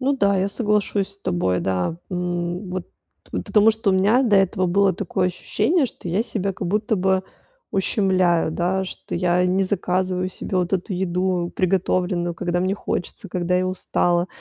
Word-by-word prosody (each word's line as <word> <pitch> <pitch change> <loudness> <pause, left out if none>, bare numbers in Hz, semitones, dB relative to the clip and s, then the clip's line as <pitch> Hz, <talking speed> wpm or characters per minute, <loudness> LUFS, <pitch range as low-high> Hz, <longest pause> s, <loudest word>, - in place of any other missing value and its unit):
Ну 275 +1 +1
да, 200 -5 +3
я 195 +2 +1
соглашусь 210 -2 0
с 200 - -18
тобой, 90 - 0
да. 95 - -1
М, 180 +1 -3
вот 185 -1 -4 0.4
потому 205 - +3
что 220 -2 0
у - - +2
меня 205 +7 +4
до 220 -6 +4
этого 190 0 +2
было 195 +2 +3
такое 185 -1 -1
ощущение, 290 - +1
что 180 - -9
я 185 +6 +1
себя 200 -4 -2
как 185 - -5
будто 210 +3 +1
бы 190 0 +2 0.5
ущемляю, 185 -4 +2
да, 180 +4 0
что 190 - -7
я 180 0 +2
не 185 +2 +2
заказываю 185 -1 0
себе 185 +1 -4
вот 180 0 0
эту 195 +1 -1
еду, 180 -1 -1
приготовленную, 180 -1 0
когда 175 +1 -1
мне 185 +2 +1
хочется, 200 0 -4
когда 180 0 0
я 185 0 +1
устала, 175 -1 0
185 Hz, 170 wpm, -22 LUFS, 175-200 Hz, 0.5 s, меня